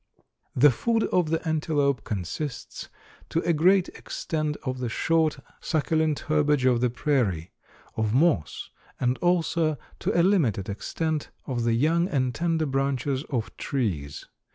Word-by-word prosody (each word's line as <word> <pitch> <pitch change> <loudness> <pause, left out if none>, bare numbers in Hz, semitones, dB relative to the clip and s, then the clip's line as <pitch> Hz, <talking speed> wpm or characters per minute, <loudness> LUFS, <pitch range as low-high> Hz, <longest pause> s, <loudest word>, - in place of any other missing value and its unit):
The 140 +3 +6
food 225 - 0
of 175 -4 +2
the 165 +1 -1
antelope 150 -4 +1
consists 110 - -5 0.4
to 165 - 0
a 170 - +1
great 180 +4 +4
extent 155 -3 -3
of 130 -1 -3
the 125 -2 -2
short, 160 +5 +1 0.2
succulent 155 -1 0
herbage 150 -3 +2
of 125 -2 +3
the 125 - +3
prairie, 115 - 0 0.4
of 110 -1 0
moss, 130 - +1 0.3
and 125 0 +1
also, 170 -3 +1 0.2
to - - 0
a - - +5
limited 135 - +2
extent, 155 +9 -3 0.2
of 120 -3 -2
the 115 - +2
young 165 +8 +2
and 130 -8 0
tender 165 0 0
branches 135 0 -1
of 120 -5 -3
trees. 90 - -3
145 Hz, 140 wpm, -26 LUFS, 125-160 Hz, 0.4 s, The